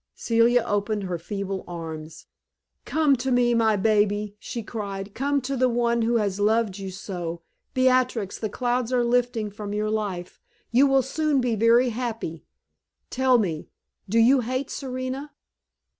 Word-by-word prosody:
Celia 235 Hz, +1 st, +3 dB
opened 205 Hz, -1 st, -1 dB
her 180 Hz, -2 st, -3 dB
feeble 195 Hz, +2 st, -4 dB
arms. 160 Hz, -2 st, -7 dB, 0.6 s
"Come 305 Hz, -3 st, +3 dB
to 260 Hz, +2 st, -2 dB
me, 245 Hz, -1 st, +3 dB
my 225 Hz, -2 st, +3 dB
baby!" 205 Hz, 0 st, +1 dB
she 235 Hz, +2 st, -5 dB
cried. 200 Hz, -2 st, -5 dB
"Come 280 Hz, +2 st, 0 dB
to 270 Hz, +2 st, -3 dB
the 255 Hz, 0 st, +2 dB
one 235 Hz, 0 st, +1 dB
who 230 Hz, +1 st, +1 dB
has 205 Hz, -3 st, 0 dB
loved 210 Hz, -1 st, +1 dB
you 195 Hz, -1 st, -5 dB
so! 175 Hz, -3 st, -6 dB, 0.3 s
Beatrix 255 Hz, -5 st, +2 dB
the 215 Hz, -, -2 dB
clouds 245 Hz, +2 st, -1 dB
are 250 Hz, -1 st, +2 dB
lifting 240 Hz, -3 st, 0 dB
from 205 Hz, 0 st, -6 dB
your 215 Hz, 0 st, -1 dB
life; 200 Hz, -5 st, -4 dB, 0.3 s
you 260 Hz, +4 st, +5 dB
will 270 Hz, -1 st, +3 dB
soon 300 Hz, +1 st, 0 dB
be 245 Hz, -2 st, 0 dB
very 230 Hz, +3 st, +4 dB
happy. 225 Hz, -9 st, -4 dB, 0.7 s
Tell 260 Hz, -1 st, +3 dB
me, 170 Hz, -9 st, -2 dB, 0.4 s
do 225 Hz, -, +1 dB
you 250 Hz, +4 st, +6 dB
hate 255 Hz, +3 st, -3 dB
Serena?" 260 Hz, +2 st, -5 dB
230 Hz, 155 wpm, -25 LUFS, 205-250 Hz, 0.7 s, you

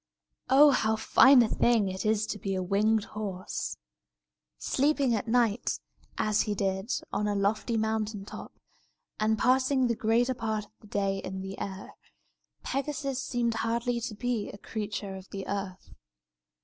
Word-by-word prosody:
Oh, 285 Hz, +3 st, +7 dB
how 220 Hz, -4 st, +2 dB
fine 250 Hz, +3 st, +6 dB
a -, -, +1 dB
thing 225 Hz, -2 st, +2 dB
it 190 Hz, +3 st, -3 dB
is 215 Hz, 0 st, +2 dB
to 210 Hz, -, -5 dB
be 195 Hz, 0 st, -2 dB
a 185 Hz, -, -1 dB
winged 210 Hz, +3 st, +2 dB
horse! 200 Hz, -4 st, -5 dB, 0.8 s
Sleeping 280 Hz, -2 st, +1 dB
at 225 Hz, +1 st, -1 dB
night, 230 Hz, -1 st, +1 dB, 0.4 s
as 215 Hz, 0 st, +2 dB
he 210 Hz, -2 st, -1 dB
did, 190 Hz, +2 st, -1 dB, 0.2 s
on 210 Hz, -, 0 dB
a 205 Hz, -, 0 dB
lofty 215 Hz, +3 st, 0 dB
mountain 220 Hz, -2 st, -1 dB
top, -, -, -9 dB, 0.7 s
and 220 Hz, +1 st, +2 dB
passing 260 Hz, +3 st, +3 dB
the 235 Hz, -1 st, +1 dB
greater 230 Hz, +4 st, +2 dB
part 220 Hz, -3 st, -3 dB
of -, -, -27 dB
the 215 Hz, -, -17 dB
day 195 Hz, -1 st, -1 dB
in 190 Hz, 0 st, -5 dB
the 195 Hz, +1 st, -7 dB
air, 195 Hz, 0 st, -6 dB, 0.7 s
Pegasus 275 Hz, -1 st, -2 dB
seemed 240 Hz, -3 st, -1 dB
hardly 235 Hz, +1 st, -1 dB
to 220 Hz, -2 st, -4 dB
be 235 Hz, -1 st, -2 dB
a -, -, -9 dB
creature 210 Hz, -1 st, -5 dB
of 190 Hz, 0 st, -11 dB
the 195 Hz, -1 st, -6 dB
earth. 195 Hz, -1 st, -5 dB
220 Hz, 160 wpm, -29 LUFS, 200-240 Hz, 0.8 s, Oh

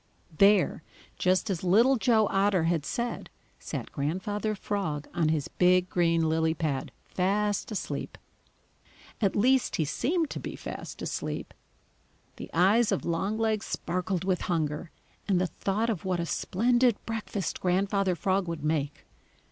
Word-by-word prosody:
There, 200 Hz, -2 st, +4 dB, 0.4 s
just 185 Hz, +3 st, +2 dB
as 180 Hz, -2 st, -3 dB
Little 225 Hz, +9 st, +5 dB
Joe 225 Hz, -3 st, +3 dB
Otter 195 Hz, -3 st, +2 dB
had 165 Hz, -4 st, 0 dB
said, 240 Hz, 0 st, -3 dB, 0.3 s
sat -, -, -6 dB
Grandfather 190 Hz, +8 st, -2 dB
Frog 165 Hz, -8 st, -3 dB
on 165 Hz, -2 st, +1 dB
his 155 Hz, -3 st, 0 dB
big 180 Hz, 0 st, +3 dB
green 165 Hz, -2 st, +2 dB
lily 160 Hz, 0 st, +1 dB
pad, 145 Hz, -5 st, -2 dB
fast 205 Hz, +3 st, 0 dB
asleep. 210 Hz, -, -4 dB, 1.0 s
At 200 Hz, -3 st, +2 dB
least, 255 Hz, +5 st, +3 dB
he 160 Hz, -, +1 dB
seemed 320 Hz, -, 0 dB
to -, -, -4 dB
be -, -, -6 dB
fast -, -, -7 dB
asleep. -, -, -4 dB, 0.8 s
The -, -, -8 dB
eyes 205 Hz, +7 st, +4 dB
of 195 Hz, -, -1 dB
Longlegs 215 Hz, +5 st, 0 dB
sparkled 180 Hz, 0 st, -2 dB
with 185 Hz, -1 st, 0 dB
hunger 155 Hz, -1 st, -1 dB, 0.4 s
and 190 Hz, -3 st, +3 dB
the 185 Hz, -, +2 dB
thought 210 Hz, +5 st, -1 dB
of 190 Hz, -8 st, -4 dB
what 185 Hz, -2 st, -1 dB
a 170 Hz, -, -1 dB
splendid 240 Hz, +7 st, +2 dB
breakfast 215 Hz, -4 st, -3 dB
Grandfather 190 Hz, +1 st, +1 dB
Frog 190 Hz, +3 st, 0 dB
would 165 Hz, -3 st, -4 dB
make. 150 Hz, -2 st, -1 dB
185 Hz, 140 wpm, -28 LUFS, 165-210 Hz, 1.0 s, Little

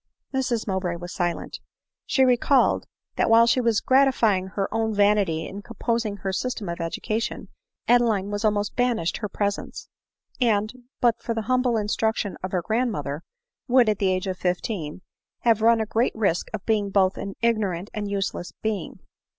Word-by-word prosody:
Mrs 250 Hz, -4 st, 0 dB
Mowbray 190 Hz, -3 st, -1 dB
was 175 Hz, +1 st, -7 dB
silent; 175 Hz, -1 st, -3 dB, 0.5 s
she 265 Hz, -, +4 dB
recollected, 255 Hz, +1 st, +3 dB, 0.3 s
that -, -, +2 dB
while 230 Hz, +1 st, +7 dB
she 245 Hz, +2 st, +3 dB
was 230 Hz, -3 st, +2 dB
gratifying 240 Hz, -8 st, +3 dB
her 195 Hz, +1 st, -2 dB
own 225 Hz, -1 st, 0 dB
vanity 200 Hz, -6 st, +2 dB
in 200 Hz, -, -7 dB
composing 230 Hz, -1 st, -2 dB
her 195 Hz, 0 st, -3 dB
sys 250 Hz, +7 st, -2 dB
tem 200 Hz, -5 st, -6 dB
of 170 Hz, 0 st, -4 dB
education, 215 Hz, +8 st, -3 dB, 0.4 s
Adeline 225 Hz, -5 st, +3 dB
was 205 Hz, +1 st, -3 dB
almost 205 Hz, -1 st, 0 dB
banished 240 Hz, -9 st, 0 dB
her 210 Hz, -, -4 dB
pre 205 Hz, +1 st, 0 dB
sence; -, -, -8 dB, 0.5 s
and, 215 Hz, -2 st, +2 dB, 0.3 s
but 235 Hz, -2 st, +3 dB
for 230 Hz, -, -3 dB
the 225 Hz, -, -2 dB
humble 250 Hz, -1 st, +1 dB
instruction 215 Hz, 0 st, -1 dB
of 185 Hz, -, -4 dB
her 180 Hz, -2 st, -1 dB
grand 235 Hz, +5 st, 0 dB
mother, 145 Hz, -5 st, -4 dB, 0.5 s
would, 250 Hz, -2 st, +5 dB
at 210 Hz, -2 st, +1 dB
the 195 Hz, -, +2 dB
age 185 Hz, 0 st, 0 dB
of 185 Hz, -1 st, -4 dB
fifteen, 180 Hz, -2 st, -3 dB, 0.4 s
have 230 Hz, -2 st, +3 dB
run 230 Hz, +1 st, +5 dB
a 220 Hz, -, 0 dB
great 225 Hz, +3 st, 0 dB
risk 195 Hz, -6 st, 0 dB
of 215 Hz, -3 st, -6 dB
being 210 Hz, -3 st, +1 dB
both 190 Hz, -1 st, +3 dB
an 195 Hz, -1 st, -6 dB
ignorant 205 Hz, -5 st, 0 dB
and 205 Hz, -2 st, -3 dB
useless 195 Hz, -3 st, -3 dB
being. 215 Hz, -4 st, -3 dB
210 Hz, 175 wpm, -24 LUFS, 190-230 Hz, 0.5 s, while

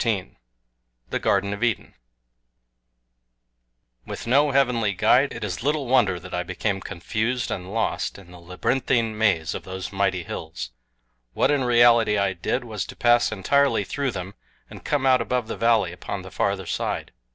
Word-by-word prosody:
XIV 105 Hz, -6 st, -1 dB, 0.8 s
THE -, -, 0 dB
GARDEN 100 Hz, +1 st, +1 dB
OF 105 Hz, -, -4 dB
EDEN 120 Hz, -3 st, -1 dB, 2.1 s
WITH -, -, -6 dB
NO 140 Hz, +5 st, +4 dB
HEAVENLY 125 Hz, -6 st, +2 dB
GUIDE, 125 Hz, +8 st, +3 dB
IT -, -, -6 dB
IS 95 Hz, -5 st, -3 dB
LITTLE 145 Hz, +2 st, 0 dB
WONDER 120 Hz, -8 st, +3 dB
that -, -, -11 dB
I 90 Hz, -, 0 dB
became 95 Hz, +2 st, -2 dB
confused 110 Hz, +8 st, -2 dB
and 90 Hz, +1 st, -5 dB
lost 115 Hz, +1 st, -1 dB
in 95 Hz, -3 st, -14 dB
the 90 Hz, -, -12 dB
labyrinthine 115 Hz, +6 st, 0 dB
maze 100 Hz, -7 st, +1 dB
of -, -, -6 dB
those 95 Hz, +1 st, -6 dB
mighty 95 Hz, -2 st, 0 dB
hills. 65 Hz, -5 st, -6 dB, 0.6 s
What, 135 Hz, -, +2 dB
in 145 Hz, -2 st, +2 dB
reality, 120 Hz, -3 st, +5 dB
I 100 Hz, -1 st, +1 dB
did 95 Hz, +8 st, -2 dB
was 110 Hz, -5 st, -4 dB
to -, -, -9 dB
pass 120 Hz, 0 st, +3 dB
entirely 115 Hz, +3 st, +2 dB
through 140 Hz, +7 st, -2 dB
them 95 Hz, -3 st, -6 dB, 0.4 s
and -, -, -11 dB
come 145 Hz, -2 st, 0 dB
out 130 Hz, -2 st, +5 dB
above 125 Hz, 0 st, -1 dB
the 115 Hz, -, -4 dB
valley 115 Hz, -6 st, +2 dB
upon 95 Hz, +2 st, -6 dB
the 95 Hz, -, -10 dB
farther 95 Hz, 0 st, -1 dB
side. -, -, -3 dB
110 Hz, 165 wpm, -24 LUFS, 95-125 Hz, 2.1 s, reality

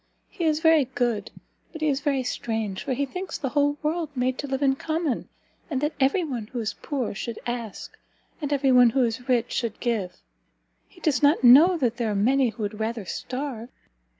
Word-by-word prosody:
he 340 Hz, -, -4 dB
is 310 Hz, -1 st, +1 dB
very 320 Hz, -3 st, +5 dB
good, 240 Hz, -5 st, -1 dB, 0.4 s
but 320 Hz, -, -9 dB
he 310 Hz, -, +1 dB
is 275 Hz, -2 st, +1 dB
very 280 Hz, -3 st, 0 dB
strange, 220 Hz, -5 st, -3 dB
for 270 Hz, -, -1 dB
he 280 Hz, +3 st, 0 dB
thinks 360 Hz, +5 st, -5 dB
the 270 Hz, -, -3 dB
whole 290 Hz, +1 st, +1 dB
world 320 Hz, +1 st, -1 dB
made 255 Hz, 0 st, 0 dB
to 285 Hz, -, -5 dB
live 270 Hz, +1 st, -2 dB
in 270 Hz, -1 st, +3 dB
common, 315 Hz, -2 st, -2 dB, 0.4 s
and 275 Hz, -5 st, -1 dB
that 295 Hz, +3 st, -1 dB
every 275 Hz, +7 st, +2 dB
one 245 Hz, -9 st, -4 dB
who 245 Hz, -, -5 dB
is 220 Hz, -1 st, -2 dB
poor 270 Hz, -6 st, -2 dB
should 225 Hz, +2 st, -5 dB
ask, 240 Hz, -3 st, -5 dB, 0.5 s
and 290 Hz, -1 st, -3 dB
every 275 Hz, -2 st, +2 dB
one 250 Hz, -1 st, +7 dB
who 260 Hz, +3 st, +2 dB
is 240 Hz, +2 st, -3 dB
rich 240 Hz, -2 st, +2 dB
should 230 Hz, -3 st, -2 dB
give: 220 Hz, -7 st, -2 dB, 0.7 s
he -, -, -19 dB
does 305 Hz, -4 st, +1 dB
not 290 Hz, 0 st, +4 dB
know 300 Hz, +9 st, +8 dB
that 240 Hz, -6 st, 0 dB
there 235 Hz, -2 st, -1 dB
are 210 Hz, -, -1 dB
many 255 Hz, +5 st, +3 dB
who 220 Hz, 0 st, -6 dB
would 210 Hz, +1 st, -4 dB
rather 220 Hz, -1 st, -3 dB
starve." 255 Hz, +2 st, -5 dB
260 Hz, 205 wpm, -25 LUFS, 235-290 Hz, 0.7 s, know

